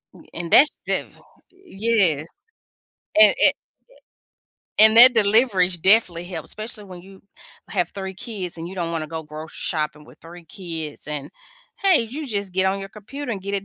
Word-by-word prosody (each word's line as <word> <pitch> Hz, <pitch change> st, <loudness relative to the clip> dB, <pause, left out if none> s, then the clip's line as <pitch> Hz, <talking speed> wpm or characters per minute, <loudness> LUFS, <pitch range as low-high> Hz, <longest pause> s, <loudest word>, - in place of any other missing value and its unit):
N -, -, -16 dB
and 170 Hz, -1 st, -7 dB
that's 295 Hz, +3 st, +6 dB
def -, -, -4 dB, 0.5 s
Yes, 195 Hz, -, 0 dB, 0.9 s
and 325 Hz, -, +8 dB
and -, -, +6 dB, 1.3 s
and 220 Hz, +1 st, +7 dB
that 245 Hz, +2 st, +9 dB
delivery's 205 Hz, -4 st, +3 dB
definitely 180 Hz, -2 st, +2 dB
helped, 175 Hz, -3 st, -8 dB
especially 215 Hz, -1 st, -8 dB
when 185 Hz, -2 st, -12 dB
you 195 Hz, +1 st, -17 dB, 0.5 s
have -, -, -2 dB
3 190 Hz, -1 st, -7 dB
kids 190 Hz, -4 st, -7 dB
and 165 Hz, 0 st, -7 dB
you 190 Hz, -, -10 dB
don't 170 Hz, -2 st, -4 dB
wanna 160 Hz, -2 st, -4 dB
go 160 Hz, +1 st, -7 dB
grocery 155 Hz, +1 st, -11 dB
shopping 150 Hz, -2 st, -4 dB
with -, -, -18 dB
3 170 Hz, +1 st, -14 dB
kids, 165 Hz, -4 st, -7 dB
and 150 Hz, -1 st, -5 dB, 0.5 s
hey, 375 Hz, -9 st, +5 dB
you 275 Hz, +7 st, -7 dB
just 200 Hz, -5 st, -3 dB
get 190 Hz, +1 st, +1 dB
on 190 Hz, +1 st, -1 dB
your 195 Hz, -, -8 dB
computer 235 Hz, +6 st, -8 dB
and 195 Hz, -, -7 dB
get 200 Hz, +1 st, -5 dB
it 200 Hz, -1 st, -3 dB
190 Hz, 170 wpm, -21 LUFS, 165-220 Hz, 1.3 s, that